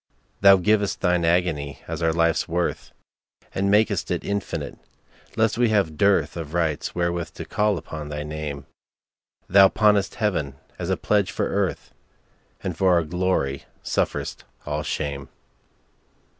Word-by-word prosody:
Thou 100 -1 +8
giv'st 105 +2 +1
Thine 90 -2 +2
agony 85 -5 0
as - - -4
our 80 -1 +2
life's 85 0 +1
worth, 85 +1 -2 0.6
And 100 +1 0
mak'st 105 -2 +2
it 90 - -1
infinite, 100 -2 -4 0.6
lest 110 +1 +2
we 120 -2 +4
have 100 -7 +2
dearthOf 80 -3 +1
rights 80 -4 -1
wherewith 85 -1 -2
to - - -6
call 105 -2 +1
upon 80 -2 -7
thy 75 0 -4
Name; 75 -2 -5 0.8
Thou 95 +1 +7
pawnest 105 -3 +2
Heaven 85 - -1 0.2
as - - -3
a - - +1
pledge 105 -3 +1
for - - -1
Earth, - - -2 0.7
And - - -3
for 95 -1 +3
our 85 -1 +3
glory 85 -5 -1 0.2
sufferest - - -2 0.2
all - - -2
shame. 70 -2 -4
85 Hz, 140 wpm, -24 LUFS, 75-100 Hz, 0.8 s, Thou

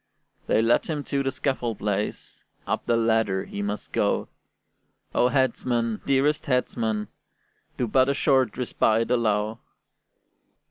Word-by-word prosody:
They 110 - +3
led 115 +1 +3
him 150 -3 -2
to 140 -1 -1
the 135 - 0
scaffold 130 -4 -2
place, 105 0 -3 0.2
Up - - -2
the 115 - +3
ladder 110 -4 +1
he 100 - -6
must 105 +1 -4
go: - - 0 0.8
"O 125 - +3
headsman, 120 -3 0
dearest 145 +3 +2
headsman, 115 -5 0 0.7
do 125 - 0
But 130 +4 +3
a 140 - +1
short 130 -5 +2
respite 115 -2 +1
allow!" 110 -2 +1
120 Hz, 130 wpm, -25 LUFS, 110-130 Hz, 0.8 s, They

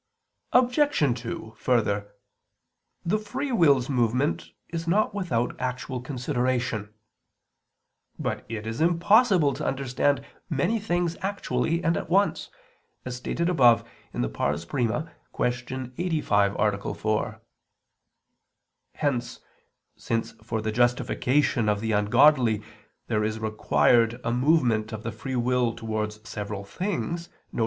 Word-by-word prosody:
Obj. 250 - +3
2: 115 -1 -6
Further, 105 -4 0 0.9
the 205 +6 +1
free 260 +7 -4
will's 145 - +4
movement 125 +2 0 0.2
is 165 0 -4
not 210 +4 +2
without 150 - -1
actual 130 0 -3
consideration. 125 -5 -1 1.3
But - - -3
it 110 -1 -5
is 115 +5 -4
impossible 175 - +4
to - - -5
understand 135 +1 0 0.2
many 175 +9 +1
things 175 -4 -1
actually 185 -3 -1
and 165 -1 +2
at - - -4
once, 200 +3 +2 0.6
as 125 -1 -4
stated 170 +6 -2
above 125 - +5 0.3
(I, - - -1
Q. 120 - -2
85, 115 - +1
A. 100 -2 0
4). 110 0 -2 1.5
Hence, 130 -5 -1 0.6
since 115 0 -2
for 110 0 -3
the 110 - -1
justification 120 +1 +2
of 105 -1 +1
the 110 +1 -2
ungodly 110 +1 +4 0.4
there 105 -2 0
is 110 +1 -1
required 115 +2 +2
a 115 - 0
movement 125 -5 +2
of 110 -1 -6
the 115 - -3
free 130 +5 -5
will 125 -1 +1
towards 110 -1 -4
several 105 -2 -5
things, 170 - -3 0.2
viz. - - -4
125 Hz, 115 wpm, -26 LUFS, 110-165 Hz, 1.5 s, above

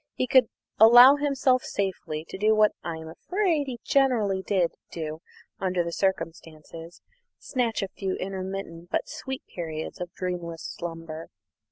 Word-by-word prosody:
He - - 0
could 255 -1 +5 0.3
allow 245 +5 +9
himself 270 -3 +2
safely 175 -5 -3
to - - -6
do 215 +1 +4
what 215 0 +5
I 170 -1 -3
am 160 0 -9
afraid 325 - -1
he 245 -3 -5
generally 230 -9 +2
did 190 -3 +1 0.2
do 155 -1 -5 0.4
under 185 -2 0
the 170 - -4
circumstances 165 -2 -4 0.3
snatch 235 -5 -1
a - - -2
few 190 0 -4
intermittent 190 -3 -5
but - - -1
sweet 265 -4 -6
periods 160 -1 -6
of 180 -1 -5
dreamless 175 -3 -4
slumber. 165 -1 -6
190 Hz, 145 wpm, -26 LUFS, 165-245 Hz, 0.4 s, allow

